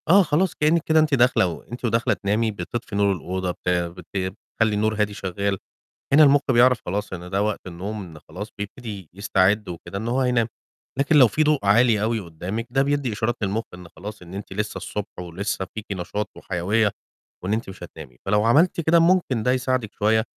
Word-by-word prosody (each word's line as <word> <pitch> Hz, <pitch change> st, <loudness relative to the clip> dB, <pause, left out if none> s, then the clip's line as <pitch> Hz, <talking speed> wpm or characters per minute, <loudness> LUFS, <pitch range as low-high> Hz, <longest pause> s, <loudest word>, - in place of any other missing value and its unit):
آه، 195 Hz, +3 st, +7 dB
خلاص 165 Hz, +3 st, +1 dB
كإنّك 155 Hz, +3 st, +3 dB
كده 160 Hz, 0 st, +3 dB
أنتِ 155 Hz, -2 st, +2 dB
داخلة 125 Hz, -7 st, +4 dB
و 85 Hz, -, -6 dB
أنتِ 120 Hz, +1 st, -7 dB
وداخلة 115 Hz, 0 st, +2 dB
تنامي 110 Hz, +3 st, 0 dB
بتطفي 105 Hz, +4 st, -5 dB
نور 100 Hz, 0 st, +3 dB
الأوضة 95 Hz, 0 st, -3 dB
بت 90 Hz, -, -5 dB
بت 90 Hz, 0 st, -1 dB
بتخلّي 100 Hz, +3 st, -1 dB
النور 110 Hz, +1 st, +1 dB
هادي 105 Hz, -1 st, 0 dB
شغّال، 100 Hz, +1 st, -2 dB, 0.6 s
هنا 155 Hz, +2 st, +8 dB
المُخ 145 Hz, -1 st, +6 dB
بيعرف 125 Hz, 0 st, +5 dB
خلاص 100 Hz, +2 st, -3 dB
إن 90 Hz, 0 st, -7 dB
ده 100 Hz, +2 st, 0 dB
وقت 105 Hz, 0 st, 0 dB
النوم 100 Hz, +4 st, -5 dB
إن 80 Hz, -4 st, -11 dB
خلاص 100 Hz, +7 st, -8 dB
بيبتدي 105 Hz, -, -7 dB
يستعد 100 Hz, +1 st, +1 dB
وكده 85 Hz, +2 st, -7 dB
إن 110 Hz, +3 st, -4 dB
هو 125 Hz, +3 st, +1 dB
هينام، 125 Hz, -3 st, +2 dB, 0.5 s
لكن 145 Hz, +3 st, +3 dB
لو 135 Hz, -4 st, +8 dB
في 150 Hz, +9 st, +1 dB
ضوء 150 Hz, -1 st, +3 dB
عالي 110 Hz, +1 st, +4 dB
أوي 110 Hz, +1 st, 0 dB
قُدّامِك، 95 Hz, +6 st, -5 dB
ده 135 Hz, +2 st, +2 dB
بيدّي 140 Hz, -4 st, 0 dB
إشارات 110 Hz, +3 st, -1 dB
للمُخ 100 Hz, +3 st, 0 dB
إن 90 Hz, -1 st, -10 dB
خلاص 105 Hz, +2 st, -8 dB
إن 90 Hz, 0 st, -12 dB
أنتِ 100 Hz, 0 st, -7 dB
لسّه 105 Hz, +2 st, -3 dB
الصبح 105 Hz, -3 st, -6 dB
ولسّه 90 Hz, +3 st, -3 dB
فيكِ 110 Hz, -1 st, -5 dB
نشاط 100 Hz, +3 st, -3 dB
وحيوية، 100 Hz, +4 st, 0 dB, 0.5 s
وإن 95 Hz, +3 st, -1 dB
أنتِ 110 Hz, -1 st, -2 dB
مش 95 Hz, -1 st, -10 dB
هتنامي، 75 Hz, -7 st, -11 dB
فلو 105 Hz, +2 st, +2 dB
عملتِ 160 Hz, +10 st, +4 dB
كده 165 Hz, +1 st, +4 dB
ممكن 165 Hz, -9 st, +2 dB
ده 125 Hz, -, +3 dB
يساعدِك 130 Hz, -4 st, -1 dB
شوية 110 Hz, +1 st, +2 dB
105 Hz, 195 wpm, -23 LUFS, 95-125 Hz, 0.6 s, هنا